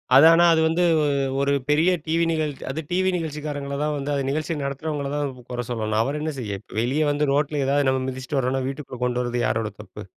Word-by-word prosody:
அது 140 - +9
ஆனா, 170 +1 +5
அது 160 - +3
வந்து 165 +2 +2
வு 150 - +2 0.4
ஒரு 140 0 +2 0.2
பெரிய 160 +5 +4
டிவி 165 +1 +1
நிகழ் 155 -2 0 0.2
அது 155 +4 -3
டிவி 185 +1 +2
நிகழ்ச்சிக்காரங்கள 145 -3 -4
தான் 150 0 0
வந்து 140 +1 -3
அது 140 - 0
நிகழ்ச்சியை 155 +2 -2
நடத்துறவங்கள 140 0 -3
தான் 145 -2 -2
கு - - -14
குறை 120 0 -2
சொல்லணும். 110 -2 -1
அவரு 145 +3 -3
என்ன 155 0 -2
செய்ய! 100 -5 -4
இப்ப - - -11
வெளிய 135 +6 0
வந்து 145 -1 0
ரோட்டில 145 0 +1
எதாவது 140 0 +2
நம்ம 130 0 +1
மிதிச்சிட்டு 130 +2 -3
வரோம்னா, 130 0 0
வீட்டுக்குள்ள 135 -2 -6
கொண்டு 125 0 0
வரது 120 0 -2
யாரோட 110 -2 -1
தப்பு? - - -10
140 Hz, 220 wpm, -23 LUFS, 130-155 Hz, 0.4 s, அது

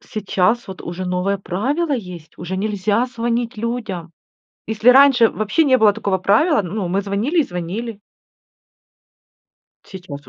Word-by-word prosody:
сейчас 215 +2 -1
вот 190 - -8
уже 175 +2 -5
новое 180 +2 -1
правило 260 - -2
есть, 180 - -6
уже 175 +2 -5
нельзя 210 +3 0
звонить 240 -1 -2
людям. 215 -7 -4 0.5
Если 220 +3 +4
раньше 260 -3 +6
вообще 215 +10 0
не 260 -3 +4
было 215 -3 +5
такого 200 -3 -1
правила, 220 - +3
ну, 185 +2 -4
мы 190 +3 0
звонили 205 - -1
и - - +6
звонили. 200 - -5 1.8
Сейчас 175 -7 -10
210 Hz, 135 wpm, -19 LUFS, 185-240 Hz, 1.8 s, раньше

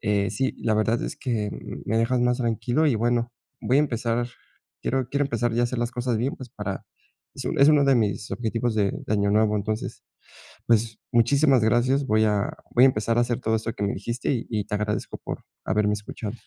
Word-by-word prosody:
eh, 100 -2 +1
sí, 130 +6 -1
la 110 - 0
verdad 110 +2 +1
es - - -4
que 110 -6 -2 0.3
me 110 +1 0
dejas 120 +2 +1
más 125 0 +2
tranquilo 120 +5 +1
y 135 - +3
bueno, 120 +1 0 0.3
voy 130 - +2
a - - +6
empezar. 120 -3 -1 0.5
Quiero 130 -1 -1
quiero 140 +1 +1
empezar 120 -2 -1
ya 120 +1 +1
a - - +4
hacer 120 0 -2
las 120 0 -1
cosas 125 -2 -1
bien, 130 +5 -1
pues, 130 -2 -9
para 100 -3 -5 0.5
es - - -7
es 140 +2 +4
uno 145 -2 +5
de 135 -1 +5
mis 105 -1 -1
objetivos 115 0 -1
de 100 -2 +2
de - - -5
Año 100 -1 +2
Nuevo, 105 0 +3
entonces, 105 +2 -4 0.6
pues, 110 -1 +2
muchísimas 130 +2 +4
gracias, 125 +5 +2
voy 110 -1 +3
a 105 -1 +1 0.2
voy 125 +2 +7
a - - +9
empezar 115 +1 -1
a - - +5
hacer 120 -1 -1
todo 110 0 0
esto 110 +1 -3
que 105 - -3
me 100 - 0
dijiste 120 +5 -4
y 120 - -2
y 105 -3 -1
te - - -4
agradezco 105 0 -2
por - - -5 0.2
haberme 105 0 +1
escuchado. 105 +2 -7
115 Hz, 215 wpm, -25 LUFS, 105-125 Hz, 0.6 s, a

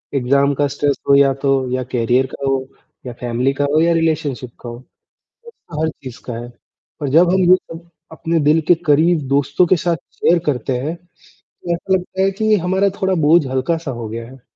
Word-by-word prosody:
Exam 140 +2 +2
का 145 +1 +1
stress 145 -1 0
हो 140 - +7
या 140 -1 +4
तो 135 -2 +1
या 130 0 -1
करियर 125 +2 +2
का 140 - -6
हो, 135 -1 -1 0.4
या 125 - -6
फ़ैमिली 125 +3 0
का 145 0 -1
हो, 155 - +4
या 170 0 +3
रिलेशनशिप 155 -7 -1
का 120 - -7
हो, 120 +1 -8 0.5
स्ट्रेस 470 0 -18 0.2
तो 150 0 -4
हर 160 - +1
चीज़ 130 -2 -9
का 125 - -5
है। 120 - -9 0.5
पर 145 -2 -2
जब 170 +5 +4
हम 190 - +2
ये - - +9
सब 170 -1 -11 0.2
अपने 165 +1 -1
दिल 160 +1 +4
के 175 - +6
करीब 160 +3 +3
दोस्तों 145 +5 +2
के 185 - +4
साथ 170 +1 0 0.2
शेयर 170 0 +2
करते 130 -2 -1
हैं, 155 +6 -3 0.5
तो 170 - -6
ऐसा 190 +3 -2
लगता 185 +1 -3
है 195 0 +2
कि 215 +2 +1
हमारा 190 +3 +1
थोड़ा 190 0 +1
बोझ 165 -2 +5
हल्का-सा 135 +3 -2
हो 120 -2 -6
गया 115 +1 -6
है। 130 0 -15
145 Hz, 210 wpm, -18 LUFS, 130-170 Hz, 0.5 s, ये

